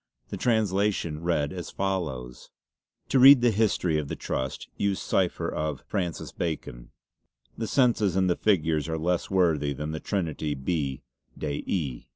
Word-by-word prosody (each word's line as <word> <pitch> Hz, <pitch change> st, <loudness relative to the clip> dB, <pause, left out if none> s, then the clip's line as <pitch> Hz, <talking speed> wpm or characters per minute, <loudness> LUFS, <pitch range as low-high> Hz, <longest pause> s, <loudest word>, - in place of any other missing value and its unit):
The -, -, -4 dB
translation 100 Hz, -8 st, 0 dB
read 80 Hz, -4 st, 0 dB
as 90 Hz, -2 st, -6 dB
follows: 75 Hz, -11 st, -3 dB, 0.6 s
"To 135 Hz, -, +3 dB
read 135 Hz, 0 st, +9 dB
the 120 Hz, -1 st, +4 dB
history 95 Hz, -7 st, +1 dB
of 75 Hz, -, -4 dB
the -, -, -4 dB
Trust 65 Hz, 0 st, -4 dB
use 100 Hz, -1 st, 0 dB
cipher 95 Hz, -3 st, 0 dB
of 75 Hz, -3 st, -3 dB
Fr. -, -, -2 dB, 0.4 s
Bacon. 75 Hz, -7 st, -4 dB, 0.7 s
The 110 Hz, -, -3 dB
senses 115 Hz, -8 st, +2 dB
and 95 Hz, -1 st, +3 dB
the 90 Hz, -, +2 dB
figures 80 Hz, -6 st, +1 dB
are 80 Hz, -, -1 dB
less 85 Hz, +2 st, -1 dB
worthy 80 Hz, -7 st, +2 dB
than 75 Hz, +3 st, -4 dB
the 80 Hz, -, -4 dB
Trinity 80 Hz, -6 st, -2 dB
B. 70 Hz, -2 st, -2 dB, 0.3 s
de 75 Hz, -2 st, -3 dB
E." 70 Hz, -10 st, -2 dB
85 Hz, 155 wpm, -27 LUFS, 75-100 Hz, 0.7 s, read